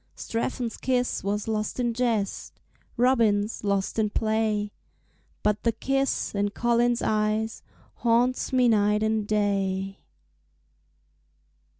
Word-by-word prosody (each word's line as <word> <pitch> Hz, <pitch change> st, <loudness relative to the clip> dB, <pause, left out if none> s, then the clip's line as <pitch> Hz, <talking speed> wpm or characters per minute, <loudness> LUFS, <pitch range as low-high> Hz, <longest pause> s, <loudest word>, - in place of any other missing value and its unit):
Strephon's 230 Hz, 0 st, -3 dB
kiss 250 Hz, -1 st, 0 dB
was 205 Hz, +2 st, -2 dB
lost 215 Hz, +1 st, -2 dB
in 240 Hz, -1 st, +1 dB
jest, 225 Hz, -5 st, -2 dB, 0.4 s
Robin's 230 Hz, -5 st, +2 dB
lost 200 Hz, +1 st, 0 dB
in 215 Hz, -1 st, +2 dB
play, 215 Hz, -1 st, 0 dB, 0.7 s
But 210 Hz, 0 st, +1 dB
the 230 Hz, -, +1 dB
kiss 270 Hz, +4 st, -1 dB
in 205 Hz, 0 st, 0 dB
Colin's 240 Hz, +2 st, +1 dB
eyes 215 Hz, +1 st, 0 dB, 0.4 s
Haunts 240 Hz, +2 st, +1 dB
me 255 Hz, -2 st, +4 dB
night 210 Hz, -1 st, +3 dB
and 220 Hz, -1 st, 0 dB
day. 195 Hz, -2 st, 0 dB
220 Hz, 105 wpm, -26 LUFS, 205-240 Hz, 0.7 s, me